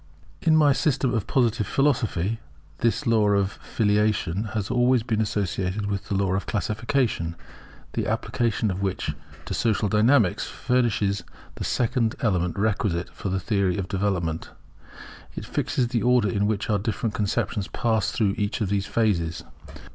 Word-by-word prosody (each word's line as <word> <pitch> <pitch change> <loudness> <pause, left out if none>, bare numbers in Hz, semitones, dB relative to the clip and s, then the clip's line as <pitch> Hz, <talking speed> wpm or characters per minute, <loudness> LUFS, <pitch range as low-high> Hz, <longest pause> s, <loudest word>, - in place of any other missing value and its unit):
In 160 -1 +4
my 145 -2 +5
System 135 -3 +1
of 110 -4 -1
Positive 115 -5 +1
Philosophy, 115 - +1 0.4
this 120 +5 +1
law 110 -3 +3
of 100 -1 +2
Filiation 105 -2 +1
has 105 -3 -2
always 125 -1 +3
been 110 -2 0
associated 100 -1 -1
with 100 0 -3
the 100 - 0
law 95 -1 +1
of 95 - -2
Classification, 110 -5 -1 0.6
the - - -1
application 115 -3 0
of 95 +1 -4
which 95 -2 -1 0.3
to - - -4
Social 110 -2 +1
Dynamics 110 -1 +3
furnishes 115 -5 0 0.3
the - - -6
second 120 -2 0
element 90 -6 0
requisite 100 -4 0
for 100 - -5
the 95 +1 0
theory 100 -2 0
of 95 -2 -3
development. 90 -5 -1 0.9
It - - -5
fixes 125 -2 -1
the 120 -2 0
order 125 -4 +3
in 100 +1 +1
which 105 -2 -1
our 105 -1 +1
different 110 +1 -2
conceptions 105 -2 -1
pass 110 +4 0
through 100 -3 +1
each 105 0 -1
of 105 -5 -1
these 100 0 0
phases. 85 -8 0
105 Hz, 155 wpm, -25 LUFS, 100-115 Hz, 0.9 s, my